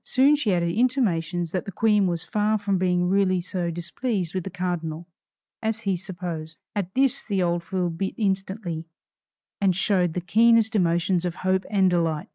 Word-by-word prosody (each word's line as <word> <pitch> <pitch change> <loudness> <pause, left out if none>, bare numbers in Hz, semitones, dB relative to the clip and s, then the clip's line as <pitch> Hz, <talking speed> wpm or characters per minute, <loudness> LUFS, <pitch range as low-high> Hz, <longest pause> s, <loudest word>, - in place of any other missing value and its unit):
Soon 275 +3 +4
she 260 -8 0
added 170 -2 +1
intimations 180 - +1
that 185 - -2
the 200 - -5
Queen 210 0 +3
was 170 -2 -2
far 215 +1 +1
from 200 -2 -1
being 180 -1 +1
really 190 -1 +2
so 180 -1 -3
displeased 175 +2 -2
with 185 -2 -2
the 195 - -5
cardinal, 175 -3 -3 0.6
as 220 0 -1
he 195 -4 0
supposed. 175 -4 -6 0.2
At 190 -3 -3
this 270 -1 +2
the 195 -4 0
old 170 0 0
fool 180 0 -2
bit 190 +4 -3
instantly, 190 -4 -2 0.8
and 190 -3 +3
showed 180 -3 +1
the 180 - -1
keenest 225 +5 +4
emotions 175 -1 +2
of 175 -1 -2
hope 190 0 +2
and 195 -2 +3
delight. 165 -4 0
185 Hz, 175 wpm, -25 LUFS, 175-205 Hz, 0.8 s, Soon